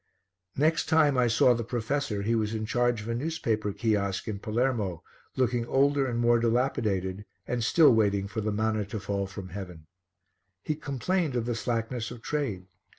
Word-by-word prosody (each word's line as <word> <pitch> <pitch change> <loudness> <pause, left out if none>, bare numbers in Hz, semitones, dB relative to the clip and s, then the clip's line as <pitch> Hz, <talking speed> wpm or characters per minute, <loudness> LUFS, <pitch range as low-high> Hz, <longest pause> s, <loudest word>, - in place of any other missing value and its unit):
Next 155 +3 +2
time 155 -3 +4
I 125 -1 +3
saw 120 +2 +4
the 115 0 -2
professor 115 -2 -2
he 115 +3 +1
was 110 -1 0
in 110 0 -2
charge 120 0 +1
of - - -9
a 115 - -1
newspaper 115 -6 -1
kiosk 100 -2 -1
in 105 -2 -3
Palermo, 110 -6 -1 0.3
looking 120 -2 0
older 140 +1 +2
and 120 -2 -2
more 120 0 +4
dilapidated 110 -6 0 0.2
and 120 -2 -2
still 145 +3 +6
waiting 100 -3 +2
for 110 +2 -4
the 110 0 -1
manna 110 0 0
to 105 +2 -5
fall 100 -1 -2
from 95 -1 -8
heaven. 90 -4 -8 0.8
He 155 - -1
complained 150 +2 -1
of 120 -2 0
the 120 - -1
slackness 115 0 -2
of 120 -2 -10
trade. 115 -12 -2
115 Hz, 175 wpm, -28 LUFS, 105-125 Hz, 0.8 s, still